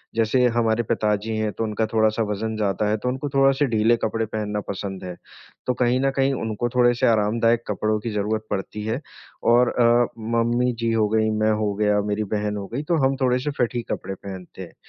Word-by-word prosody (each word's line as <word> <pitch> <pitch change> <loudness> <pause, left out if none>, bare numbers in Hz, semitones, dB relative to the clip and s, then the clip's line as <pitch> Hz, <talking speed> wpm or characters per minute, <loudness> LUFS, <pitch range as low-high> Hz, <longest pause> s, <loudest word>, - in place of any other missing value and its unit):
जैसे 115 +3 +2
हमारे 115 0 +2
पिताजी 105 0 -1
हैं 110 -1 -1
तो - - -3
उनका 110 0 -1
थोड़ा-सा 110 0 +2
वजन 110 +2 -3
ज़्यादा 105 -1 0
है 105 - +1
तो 125 +4 -2
उनको 130 +3 -3
थोड़ा-से 135 +1 +3
ढीले 115 0 +3
कपड़े 115 +1 0
पहनना 105 -1 -3
पसंद 95 -1 -5
है। 90 -1 -6 0.5
तो 125 - +2
कहीं 125 +1 +3
न 135 0 +2
कहीं 135 0 +2
उनको 110 +2 -2
थोड़े 120 -1 +5
से - - +2
आरामदायक 115 +1 +2
कपड़ों 110 0 0
की 115 - -4
ज़रूरत 105 +1 -1
पड़ती 105 +1 -4
है 110 +4 -1 0.5
और 120 0 +5
अ, 125 - +1 0.5
मम्मी-जी 120 0 +1
हो 110 -1 +2
गई, 110 0 +2
मैं 110 0 +1
हो 105 -1 0
गया, 105 0 +2
मेरी 105 +1 -1
बहन 105 0 -2
हो 100 -1 -5
गयी 140 +5 -2
तो - - +3
हम 135 +1 +2
थोड़े 125 -1 +2
से 145 +3 -2
फिट 125 0 +1
ही 120 - 0
कपड़े 95 +1 -4
पहनते 95 -1 -9
हैं। 90 - -9
110 Hz, 210 wpm, -23 LUFS, 105-120 Hz, 0.5 s, थोड़े